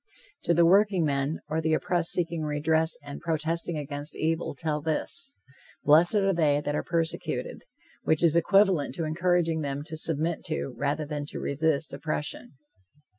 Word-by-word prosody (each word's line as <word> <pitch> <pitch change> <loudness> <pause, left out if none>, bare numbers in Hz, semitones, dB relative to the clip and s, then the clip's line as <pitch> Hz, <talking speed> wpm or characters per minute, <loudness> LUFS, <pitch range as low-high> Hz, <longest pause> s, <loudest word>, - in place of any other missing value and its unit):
To 170 - +3
the 170 +1 +5
workingmen, 165 -7 +2
or 155 +1 -1
the 160 0 +2
oppressed 175 +1 0
seeking 170 -2 0
redress 160 +2 +1
and 145 0 -8
protesting 165 +1 -1
against 145 +1 -5
evil, 160 -1 -1
tell 150 +1 -1
this: 270 - -2 0.5
"Blessed 160 +7 +6
are 195 -1 +3
they 150 -4 +3
that 145 0 -3
are - - 0
persecuted," 165 -1 -2 0.4
which 160 +1 +1
is 165 -1 +4
equivalent 190 -2 +3
to 165 - -2
encouraging 165 0 +1
them 140 -1 -3
to 160 +1 -8
submit 160 +1 -2
to, 155 -4 -3
rather 145 +4 -1
than 145 -1 -4
to - - -6
resist, 155 +1 0
oppression. 155 +9 -4
160 Hz, 155 wpm, -27 LUFS, 150-170 Hz, 0.5 s, Blessed